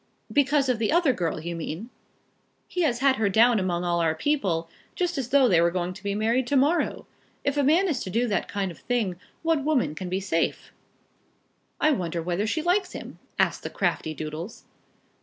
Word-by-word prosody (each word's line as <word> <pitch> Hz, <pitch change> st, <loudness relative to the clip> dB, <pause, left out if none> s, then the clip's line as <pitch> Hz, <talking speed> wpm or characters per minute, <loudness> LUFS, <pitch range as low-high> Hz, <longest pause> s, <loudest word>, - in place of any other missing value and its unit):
"Because 285 Hz, -1 st, +3 dB
of 250 Hz, -3 st, +1 dB
the 220 Hz, -, +1 dB
other 330 Hz, -5 st, +4 dB
girl, 170 Hz, -6 st, -2 dB
you 170 Hz, +2 st, -5 dB
mean?" 165 Hz, +8 st, -6 dB, 0.8 s
"He 360 Hz, -, -2 dB
has 255 Hz, -7 st, +1 dB
had 270 Hz, -1 st, +4 dB
her 220 Hz, -2 st, +2 dB
down 225 Hz, +3 st, +5 dB
among 180 Hz, -2 st, -1 dB
all 175 Hz, -1 st, +1 dB
our 160 Hz, -1 st, +1 dB
people, 180 Hz, -, 0 dB, 0.3 s
just 355 Hz, -2 st, -1 dB
as 260 Hz, -4 st, -3 dB
though 275 Hz, -1 st, +5 dB
they 175 Hz, -7 st, +4 dB
were 170 Hz, -, +4 dB
going 180 Hz, 0 st, -2 dB
to -, -, -12 dB
be 200 Hz, 0 st, -2 dB
married 230 Hz, +4 st, +1 dB
to 285 Hz, -, 0 dB
morrow. 290 Hz, +6 st, +2 dB, 0.4 s
If 280 Hz, 0 st, 0 dB
a 290 Hz, -, +2 dB
man 320 Hz, +8 st, +4 dB
is 295 Hz, -8 st, 0 dB
to -, -, -5 dB
do 235 Hz, +6 st, +1 dB
that 205 Hz, -4 st, -1 dB
kind 195 Hz, -2 st, -2 dB
of 170 Hz, -, -13 dB
thing, 220 Hz, -8 st, -1 dB, 0.3 s
what 325 Hz, -3 st, +1 dB
woman 285 Hz, -, +1 dB
can 180 Hz, +3 st, -6 dB
be 185 Hz, +1 st, -1 dB
safe?" 175 Hz, -4 st, -1 dB, 1.1 s
"I 310 Hz, -, +4 dB
wonder 175 Hz, -, -1 dB
whether 175 Hz, +5 st, -1 dB
she 310 Hz, +8 st, -1 dB
likes 365 Hz, +2 st, +1 dB
him?" -, -, -9 dB, 0.2 s
asked -, -, +1 dB
the -, -, -5 dB
crafty 155 Hz, 0 st, -1 dB
Doodles. 155 Hz, +8 st, -6 dB
225 Hz, 205 wpm, -26 LUFS, 175-280 Hz, 1.1 s, down